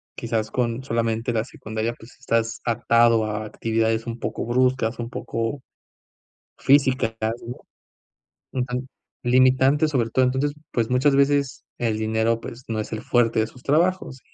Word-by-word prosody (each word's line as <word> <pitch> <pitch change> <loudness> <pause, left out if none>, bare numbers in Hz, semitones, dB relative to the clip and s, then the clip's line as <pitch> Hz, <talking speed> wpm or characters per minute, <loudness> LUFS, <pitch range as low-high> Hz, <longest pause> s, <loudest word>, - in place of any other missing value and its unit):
quizás 110 -1 -2
con 120 0 -1
solamente 115 -1 -1
la 115 0 0
secundaria, 110 -1 -4
pues 115 +3 -16
estás 115 -2 0
atado 115 -1 +3
a 110 0 -3
actividades 115 +1 -1
un 115 0 -5
poco - - -3
bruscas, 125 -1 +1
un 115 0 -4
poco 115 +3 -3 1.0
físicas, 130 -5 +3 0.3
¿no? 120 - -6 0.9
Un 125 -1 -1
tan 125 +1 -4 0.3
limitantes, 130 +4 +4
sobre 120 -5 +1
todo. 130 +3 +3
Entonces, 135 +3 0 0.2
pues, 115 -1 0
muchas 130 +3 +3
veces 140 -1 +2
el 110 -2 -1
dinero, 110 +1 +1
pues, 120 +2 -9
no 110 -1 -1
es 110 - -5
el 110 - -4
fuerte 115 -2 +2
de 110 - +3
sus 125 +2 -16
trabajos. 160 -2 +1
120 Hz, 150 wpm, -23 LUFS, 115-130 Hz, 1.0 s, limitantes